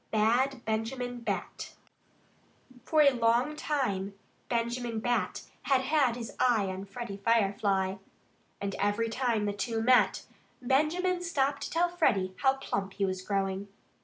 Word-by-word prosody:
XVII 220 - -2
BAD 250 +4 +2
BENJAMIN 240 +3 -2
BAT 235 - -4 1.1
For 310 -1 +4
a 280 - +6
long 240 +4 +2
time 205 -11 -2 0.3
Benjamin 235 -1 -1
Bat 240 +2 -1 0.2
had 270 -2 +3
had 265 -3 +2
his 235 -2 -7
eye 230 -6 +3
on 190 +1 -5
Freddie 200 0 -7
Firefly. 195 -3 +1 0.6
And 200 -1 -3
every 205 +3 +1
time 230 -3 0
the 205 - -1
two 225 +3 -2
met, 250 +3 +3 0.3
Benjamin 320 +8 +1
stopped 280 -5 0
to - - -4
tell 340 +2 +2
Freddie 220 - +1
how 265 0 +3
plump 195 -7 -3
he 200 - 0
was 185 -1 -3
growing. 195 0 -2
235 Hz, 140 wpm, -29 LUFS, 200-265 Hz, 1.1 s, a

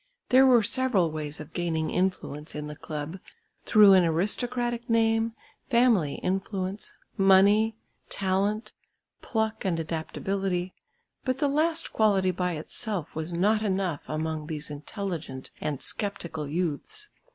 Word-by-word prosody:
There 260 +1 +7
were 245 -3 +6
several 230 - +2
ways 150 -1 -4
of 155 +1 -10
gaining 165 -3 -1
influence 180 -5 -2
in 150 0 -4
the 150 0 -7
club, 155 +3 -6 0.5
through 210 -2 +7
an 185 -1 +6
aristocratic 240 +8 0
name, 225 0 +2 0.4
family 235 - +3
influence, 190 +1 -2 0.2
money, 200 +3 +5 0.3
talent, 200 +3 -1 0.5
pluck 220 -1 -1
and 180 -4 0
adaptability, 180 +3 -2 0.5
but 255 -1 0
the 290 - +1
last 320 +3 0
quality 195 -4 +3
by 180 0 -1
itself 170 +3 -4
was 160 +2 -4
not 205 +6 +2
enough 190 -6 -1
among 155 0 -3
these 150 -2 -5
intelligent 155 -3 -5
and 145 -3 -3
sceptical 170 -7 -4
youths. 180 - -3
190 Hz, 125 wpm, -27 LUFS, 160-220 Hz, 0.5 s, There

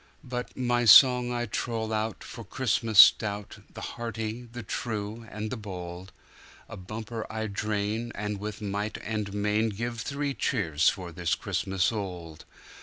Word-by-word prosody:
But 125 -1 -5
my 120 -1 +1
song 125 +3 +8
I 120 0 -1
troll 110 0 -2
out, 110 0 -2
for 115 - -9
Christmas 110 -1 -1
stout, 105 0 +6
The - - -9
hearty, 115 0 -5
the 120 0 -7
true, 110 +1 -4
and 105 0 -5
the - - -3
bold;A 90 -3 -10
bumper 110 +4 -6
I 110 0 -3
drain, 105 +2 -2
and 105 0 -3
with 105 +1 -6
might 105 +1 -2
and 105 -2 -3
mainGive 110 +3 -1
three 140 +3 -2
cheers 85 - +2
for 95 -4 -5
this 85 0 0
Christmas 95 0 0
old. 90 -7 -6
110 Hz, 140 wpm, -28 LUFS, 100-115 Hz, -, song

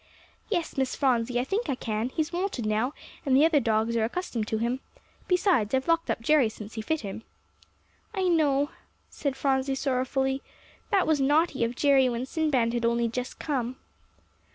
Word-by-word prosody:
"Yes, 345 -8 -2
Miss 265 -1 0
Phronsie, 245 -3 +1
I - - +1
think 395 - -2
I 270 - +1
can; 220 0 -2
he's 315 +4 -2
wonted 350 - -2
now, 215 +5 +1 0.3
and 270 -3 +2
the 295 - +6
other 320 -3 +4
dogs 225 -2 +1
are 225 - +2
accustomed 235 -4 -2
to 220 - -1
him. 240 +3 -1 0.5
Besides, 355 - +2
I've 265 +3 -1
locked 330 0 +2
up - - -1
Jerry 270 -1 +4
since 215 0 -10
he 220 - -4
fit 315 +8 -1
him." 200 0 -6 0.9
"I 385 -4 -2
know," 295 -5 +2 0.4
said 280 -3 -3
Phronsie 270 0 +1
sorrowfully; 265 0 0 0.5
"that 395 -4 +3
was 310 -3 +2
naughty 290 -1 +2
of 230 +1 -1
Jerry 270 -2 +4
when 240 +1 -2
Sinbad 265 -6 +1
had 240 -1 -1
only 235 0 +2
just 250 +2 -4
come." 260 -4 -2
265 Hz, 175 wpm, -27 LUFS, 235-305 Hz, 0.9 s, the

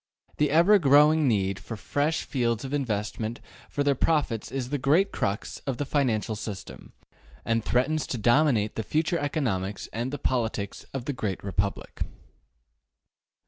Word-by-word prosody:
This 150 -1 +2
ever 175 +8 +6
growing 150 0 +5
need 100 -4 +1
for 115 - -7
fresh 145 - 0
fields 120 -2 -1
of 135 - -5
investment 110 -3 -2 0.3
for 145 - -1
their 140 0 +3
profits 135 -5 0
is 130 -2 -3
the 145 - 0
great 160 +10 +3
crux 100 +1 -2
of 130 -3 -1
the 145 - -2
financial 120 -7 0
system, 105 -2 -8 0.5
and 115 -1 +1
threatens 135 +6 +1
to 125 - -3
dominate 120 -2 +3
the - - 0
future 160 +8 0
economics 110 - -2
and 120 +3 -2
the 145 - -3
politics 110 -6 -2
of 135 -3 -5
the 145 - -2
great 105 -7 -3
Republic. 100 +1 -3
125 Hz, 150 wpm, -27 LUFS, 110-145 Hz, 0.5 s, ever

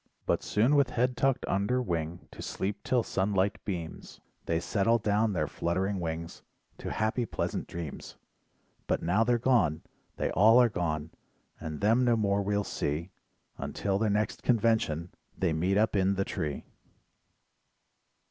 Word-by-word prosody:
But - - +1
soon 120 +8 +2
with 140 -3 +4
head 125 +1 0
tucked 135 0 +1
under 100 +6 +1
wing 85 -6 -3
to - - -10
sleep 100 +2 -3
till 125 -2 +2
sunlight 100 0 0
beams, 85 -5 -6 0.3
They 80 0 +1
settle 110 +6 +2
down 105 0 +1
their 75 -4 0
fluttering 95 +6 -1
wings 85 0 -5 0.4
to - - -5
happy 110 +3 0
pleasant - - -3
dreams, 85 -4 -7 0.7
But - - 0
now 95 +7 +3
they're 120 +1 +2
gone, 115 - +2 0.3
they - - -1
all 110 +5 +6
are 120 -1 +5
gone, 80 -5 -2 0.5
and 80 -1 -6
them 115 +5 +4
no 120 -1 +4
more 100 -2 +1
we'll 100 +1 0
see 80 +1 -3 0.5
Until 100 -1 -1
their 110 0 +1
next 105 +1 0
convention 110 -9 +1 0.3
they 90 -4 +1
meet 90 +5 +1
up 110 0 +2
in 95 0 +2
the 95 0 0
tree. 75 -2 -4
100 Hz, 150 wpm, -29 LUFS, 85-115 Hz, 0.7 s, all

